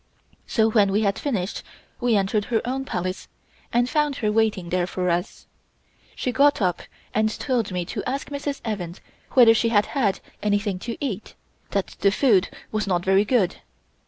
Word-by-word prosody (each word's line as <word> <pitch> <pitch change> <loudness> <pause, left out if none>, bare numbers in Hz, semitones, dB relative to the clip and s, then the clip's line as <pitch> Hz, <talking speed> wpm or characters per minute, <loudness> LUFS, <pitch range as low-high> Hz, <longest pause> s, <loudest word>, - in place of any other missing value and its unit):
So 220 -2 +3
when 205 -3 +4
we 205 +2 +2
had 200 -2 +1
finished 210 -10 -2 0.4
we 240 -2 +2
entered 200 +1 +1
her 230 -2 +1
own 265 +2 -2
Palace 185 -4 -3 0.4
and 240 +1 +2
found 295 +1 +1
her 215 -4 0
waiting 210 -5 +1
there 180 0 0
for 180 -1 -1
us. 175 +4 -3 0.7
She 250 - -2
got 285 +3 +4
up 180 -4 0 0.3
and 215 +1 +2
told 240 -7 -1
me 180 -1 -2
to - - -4
ask 275 +3 -3
Mrs. 285 0 -3
Evans 185 -6 -4 0.3
whether 240 -3 +8
she 230 +1 +2
had 210 -2 +3
had 220 -9 +1 0.2
anything 205 -2 0
to 230 - -3
eat 220 -8 -4 0.3
that 200 -2 -2
the 200 - +4
food 205 -4 +3 0.2
was 215 -1 -1
not 175 -2 0
very 195 +2 +4
good. 210 -6 +2
210 Hz, 175 wpm, -24 LUFS, 190-245 Hz, 0.7 s, whether